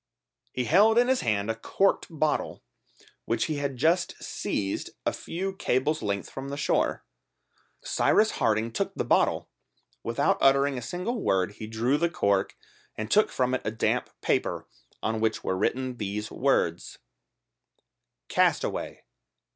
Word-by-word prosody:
He 125 - -2
held 205 - +5
in 245 +1 +5
his 260 - +2
hand 105 -1 0
a - - -4
corked 195 - +1
bottle 155 -2 -1 0.6
which 115 0 0
he 155 - -2
had 140 -2 -3
just 165 +6 +2
seized 95 -1 -3 0.2
a - - +1
few 190 +3 -4
cables' 150 -2 0
length 100 -2 -2
from 135 +1 -7
the 140 - -4
shore. - - 0 0.8
Cyrus 220 - +3
Harding 110 +1 +2
took - - -2
the - - -2
bottle - - +2 0.5
Without - - +1
uttering 140 +1 +4
a 125 - -4
single 180 - -3
word 95 - +1
he 110 +1 -8
drew 120 +6 +1
the 170 - +2
cork, 100 - 0 0.4
and 110 +1 -4
took 215 - +5
from 125 0 0
it 130 - 0
a - - -1
damp 110 0 0
paper, - - 0 0.4
on 110 0 0
which 110 0 0
were 95 - 0
written 125 +6 -1
these 105 0 -4
words: 90 -11 0 1.3
"Castaway - - 0
130 Hz, 145 wpm, -27 LUFS, 110-160 Hz, 1.3 s, held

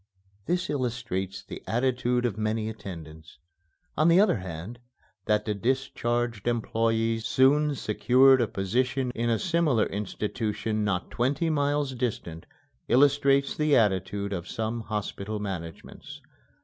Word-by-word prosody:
This 180 +1 0
illustrates 120 -8 -3
the - - -9
attitude 125 0 0
of 115 - -1
many 110 0 -1
attendants. 80 -7 -10 0.6
On 155 - +3
the 170 +2 +6
other 205 - +4
hand, 95 +5 -7 0.5
that 105 -1 +2
the 105 - 0
discharged 120 -1 -1
employé 115 -1 0
soon 140 +5 +3
secured 130 +3 +4
a 115 - +1
position 125 +7 -1
in 120 0 -1
a 115 - +2
similar 165 - +2
institution 105 +1 -3
not 100 -4 -2
twenty 145 +7 0
miles 145 -2 0
distant 110 -10 -4 0.4
illustrates 140 +1 +3
the 150 -2 +2
attitude 100 -1 0
of 90 -2 -5
some 110 +1 -3
hospital 105 -1 -4
managements. 85 -5 -7
115 Hz, 125 wpm, -27 LUFS, 105-130 Hz, 0.6 s, the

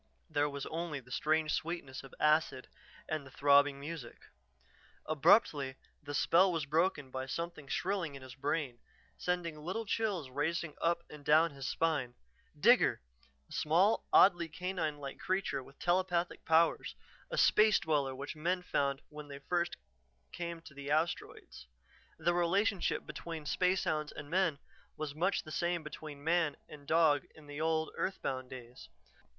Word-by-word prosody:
There 145 -1 +2
was 140 -1 -5
only 165 -3 -3
the 125 -1 -17
strange 155 +2 +1
sweetness 160 -5 -3
of 135 - -13
acid 150 -4 +2 0.4
and 155 -2 -2
the 135 - -12
throbbing 140 +1 +4
music. 145 -3 -7 0.9
Abruptly 145 -3 +3 0.3
the 145 0 -6
spell 180 +6 +4
was 165 -4 -1
broken 150 -2 0
by 130 0 -4
something 170 0 -5
shrilling 180 -3 -1
in 135 - -10
his 130 -1 -10
brain, 135 -2 -2 0.4
sending 175 -3 -2
little 190 +8 -3
chills 200 - -1
racing 155 +3 -1
up 170 0 +1
and 150 -1 -12
down 155 +3 +5
his 135 -2 -6
spine. 145 -5 0 0.4
Digger! - - +5 0.5
A - - -27
small, 180 +8 +2
oddly 175 -3 +6
canine 165 -2 -3
like 140 -2 -7
creature 185 -6 -1
with 135 +1 -16
telepathic 175 -1 0
powers, 165 +1 +3 0.3
a - - -4
space 215 -1 +5
dweller 145 -4 0
which 140 +4 -6
men 180 +4 -1
found 140 -4 0
when 150 -1 -10 0.2
first 175 -1 0
they 60 0 -17
came 170 -1 -5
to 155 - -13
the 140 0 -7
asteroids. 155 - -2 0.5
The 175 - +1
relationship 185 +3 +1
between 165 -2 -6
spacehounds 155 -3 +1
and 145 - -9
men 180 -5 +2 0.4
was 155 -2 -4
much 175 +6 0
the 155 - -10
same 175 +1 0
as 155 -1 -9
between 145 -2 -8
man 165 -2 +1
and 145 -2 -12
dog 160 -3 +4
in 155 - -15
the 145 +1 -6
old, 160 0 +1
earthbound 130 -9 -3
days. 125 -1 -10
155 Hz, 155 wpm, -33 LUFS, 140-170 Hz, 0.9 s, oddly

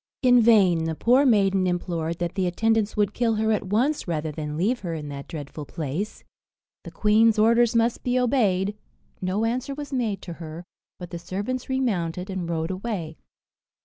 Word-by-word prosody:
In 245 -1 +6
vain 195 -8 +4
the 160 -1 -2
poor 255 - +4
maiden 195 -5 +3
implored 170 -2 -2
that 175 0 -3
the 190 -2 0
attendants 220 +3 +1
would 205 -1 +1
kill 230 -2 +1
her 220 +1 +1
at 210 -3 -1
once, 245 +9 0
rather 155 -2 -2
than 150 0 -5
leave 225 +9 +1
her 170 -3 -4
in 150 -2 -6
that 140 -1 -7
dreadful 150 -1 -7
place: 160 +7 -5 0.6
the - - -8
queen's 215 +1 +3
orders 230 +2 +4
must 230 +1 +2
be 250 0 0
obeyed; 210 -6 +1 0.5
no 190 +4 0
answer 255 +4 -2
was 290 -1 -7
made 225 -7 -1
to 175 - -6
her, 160 +1 -7 0.3
but 175 -2 -9
the 170 - -5
servants 205 +10 -4
remounted 195 -8 -1
and 180 -3 -4
rode 165 +1 -2
away. 185 -5 -4
195 Hz, 180 wpm, -25 LUFS, 170-230 Hz, 0.6 s, In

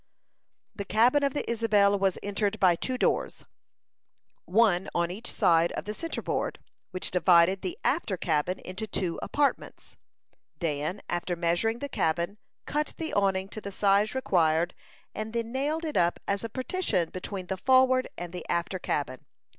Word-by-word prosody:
The 200 - -4
cabin 235 +8 +3
of 280 -1 0
the - - -2
Isabel 210 -3 +3
was 195 -2 +1
entered 205 +1 -1
by 185 -4 +5
two 255 +9 -3
doors, - - 0 1.0
one 190 -2 +3
on 170 0 +1
each 220 +6 -6
side 165 0 +3
of - - -5
the 210 - -4
centre 330 +9 -5
board, - - -2 0.3
which 185 -1 -4
divided 180 +1 +4
the 360 +2 -4
after 205 - 0
cabin 165 +2 0
into 190 +4 -6
two 180 -4 -2
apartments. 285 -1 -2 0.6
Dan, 155 +2 -2
after 175 0 -2
measuring 175 +7 0
the 285 - -4
cabin, 170 - -1 0.3
cut 300 +1 -2
the 320 -1 -4
awning 195 -1 +1
to 215 - -7
the 200 - -6
size 200 +3 +2
required, 170 -8 +2 0.4
and 215 +1 -5
then 230 -1 -2
nailed 295 +5 -1
it 305 - -4
up 175 0 +2
as 200 +1 -1
a 230 - -3
partition 255 - -1
between 185 0 -5
the 190 - -3
forward 260 +3 +4
and 175 0 -6
the 180 - -5
after 170 +2 -1
cabin. 130 -6 -3
200 Hz, 160 wpm, -28 LUFS, 175-235 Hz, 1.0 s, by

